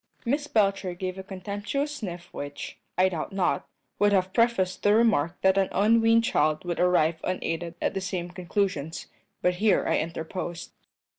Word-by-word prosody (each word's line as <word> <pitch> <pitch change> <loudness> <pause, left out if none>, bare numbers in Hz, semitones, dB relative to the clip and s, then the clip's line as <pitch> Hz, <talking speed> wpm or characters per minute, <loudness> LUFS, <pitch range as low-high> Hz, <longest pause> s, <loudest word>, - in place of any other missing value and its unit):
Miss 285 +5 0
Belcher 195 -5 +1
gave 185 +1 -4
a - - -6
contemptuous 205 +10 -3
sniff 175 -6 -6
which, 145 0 -7 0.2
I 185 +1 +5
doubt 165 -4 -4
not, 175 -8 0 0.3
would 205 0 +4
have 190 -1 +1
prefaced 230 -6 +2
the 205 +1 +4
remark 190 -8 +2
that 190 +1 +4
an 190 - +1
unweaned 225 +3 +4
child 155 - +1
would 175 -1 -2
arrive 175 -3 +3
unaided 170 -2 -3
at - - 0
the 195 - -2
same 180 -2 -3
conclusions; 180 -3 -2 0.4
but 180 0 +2
here 210 -3 +3
I - - +2
interposed. 165 +1 -5
185 Hz, 160 wpm, -27 LUFS, 175-205 Hz, 0.4 s, I